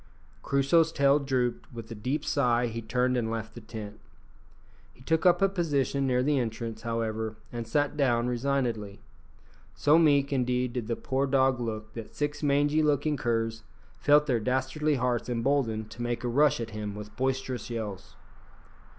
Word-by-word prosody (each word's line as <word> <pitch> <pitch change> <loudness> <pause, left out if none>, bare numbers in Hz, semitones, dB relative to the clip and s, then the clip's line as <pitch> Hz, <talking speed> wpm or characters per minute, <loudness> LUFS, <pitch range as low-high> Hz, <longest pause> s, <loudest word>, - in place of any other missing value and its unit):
Crusoe's 140 +4 +3
tail 140 -1 +4
drooped; 130 -3 -1
with 115 -2 -9
a - - -3
deep 130 +8 -3
sigh 125 -4 +2
he 115 0 -4
turned 125 +3 0
and 115 -2 0
left 110 -1 -4
the 120 - -10
tent. 110 -1 -8 1.0
He 125 - -17
took 160 +5 +2
up 180 +2 +4
a - - +6
position 145 -7 0
near 125 -1 +2
the 145 0 +2
entrance, 115 -1 -4
however, 110 -1 -2 0.2
and 115 -1 -4
sat 145 +5 0
down 120 -4 +2
resignedly. 120 -5 -2 0.7
So 150 +3 +4
meek, 145 -3 +3
indeed, 125 -1 0
did 120 -4 -3
the 115 - -1
poor 135 +3 -1
dog 130 -1 +3
look 110 -2 -5
that 115 -2 -9
six 145 0 -2
mangy 145 +1 +2
looking 150 0 +1
curs 115 -3 -1 0.4
felt 150 +1 +5
their 125 -5 +1
dastardly 130 +6 0
hearts 125 -1 -1
emboldened 115 -3 0
to 115 - -8
make 120 0 -2
a - - -1
rush 145 +4 +3
at 115 -1 -5
him 105 -1 -5
with 105 0 -9
boisterous 130 0 -2
yells. 105 -5 -6
125 Hz, 170 wpm, -28 LUFS, 115-140 Hz, 1.0 s, a